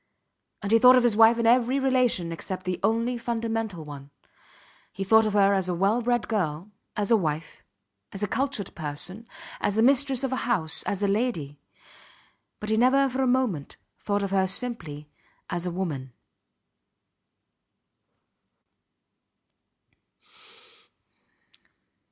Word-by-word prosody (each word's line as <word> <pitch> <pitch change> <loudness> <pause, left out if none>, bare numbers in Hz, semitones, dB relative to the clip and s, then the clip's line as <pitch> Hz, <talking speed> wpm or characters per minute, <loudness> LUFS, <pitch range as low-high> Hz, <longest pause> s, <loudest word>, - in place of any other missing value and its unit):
And 200 - -2
he 225 - +6
thought 250 +2 +8
of 250 - +4
his 240 -3 +3
wife 225 +1 +6
in 235 - 0
every 250 +3 +3
relation 255 -10 +1
except 185 +3 -6
the 185 -1 -2
only 230 +4 0
fundamental 225 -7 -3
one. 140 -1 -10 0.8
He 195 - -5
thought 220 +3 +4
of 210 - -2
her 200 -1 +4
as 190 -2 0
a 180 - -1
well 200 +7 +1
bred 240 0 0
girl, 185 -3 -2 0.3
as 205 +1 -1
a - - +7
wife, 155 -5 -3 0.5
as 195 - -6
a - - +1
cultured 260 -3 -2
person, 175 +8 -5 0.3
as 205 - -1
the 220 - +3
mistress 270 0 +3
of 265 -1 -1
a - - -1
house, 160 -9 +1
as 200 -1 -2
a - - +2
lady; 195 - -2 1.0
but 210 +1 -4
he 220 - +2
never 265 +4 +4
for 260 +1 -2
a 260 - +2
moment 245 - -1 0.2
thought 205 -1 -1
of 195 - -3
her 190 -1 +2
simply 185 - -4 0.4
as 175 +1 -3
a - - -2
woman. 155 -8 -4
210 Hz, 140 wpm, -26 LUFS, 180-240 Hz, 1.0 s, thought